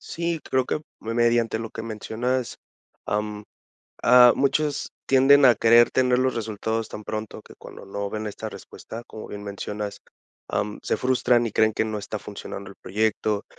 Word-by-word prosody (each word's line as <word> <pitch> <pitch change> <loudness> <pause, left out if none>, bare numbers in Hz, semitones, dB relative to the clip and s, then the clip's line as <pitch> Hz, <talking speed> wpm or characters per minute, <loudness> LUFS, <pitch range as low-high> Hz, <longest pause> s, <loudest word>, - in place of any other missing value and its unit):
Sí, 170 -1 -3
creo 130 -1 +2
que 150 - -1 0.2
me, 115 +1 -4
mediante 120 -1 +2
lo 115 -1 -6
que - - -7
mencionas, 115 +3 -3 0.5
am, 105 0 -2 0.6
ah, 125 0 +8
muchos 145 +1 0
tienden 135 +2 +6
a 125 -3 +8
querer 115 +2 +5
tener 125 -1 +2
los 130 0 +1
resultados 110 0 -3
tan 105 - -8
pronto 110 -1 -5
que - - -15
cuando - - -12
no 100 0 -4
ven 110 0 -4
esta 105 - -5
respuesta, 115 +1 -10
como 110 - -9
bien 105 0 -7
mencionas, 100 0 -5 0.5
am, 105 0 -2
se - - 0
frustran 125 -2 +2
y 105 - -5
creen 110 0 +3
que 110 - 0
no 110 -1 -3
está 105 +1 -5
funcionando 100 -1 -8
el - - -14
proyecto, 105 +1 -1
110 Hz, 170 wpm, -24 LUFS, 105-125 Hz, 0.6 s, ah